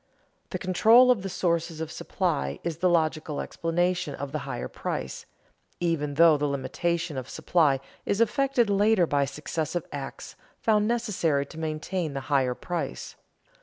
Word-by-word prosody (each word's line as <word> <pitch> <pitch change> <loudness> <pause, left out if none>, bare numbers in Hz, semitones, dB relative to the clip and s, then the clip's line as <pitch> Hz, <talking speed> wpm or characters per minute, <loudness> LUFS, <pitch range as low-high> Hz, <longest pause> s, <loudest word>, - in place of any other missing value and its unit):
The - - -3
control 225 +7 +6
of 230 -6 +1
the 195 - -4
sources 170 -3 -1
of 160 -1 -4
supply 70 +1 -2
is 165 -3 -3
the 180 +2 +2
logical 155 -3 0
explanation 175 -2 -1
of 140 0 -6
the 155 - -2
higher 125 - -3
price, 65 0 -5 0.5
even 150 -4 -1
though 165 0 +6
the 145 0 0
limitation 155 +3 -2
of 130 -1 -5
supply 150 -6 +2 0.2
is 200 - -1
effected 255 +1 +2
later 205 -1 +4
by 145 -3 +1
successive 155 +4 -3
acts 140 -2 -7 0.2
found 210 -1 +2
necessary 195 -12 0
to 160 +3 -11
maintain 160 +1 -3
the 135 - -2
higher 130 -3 +2
price. 175 +4 -4
165 Hz, 150 wpm, -27 LUFS, 145-185 Hz, 0.5 s, control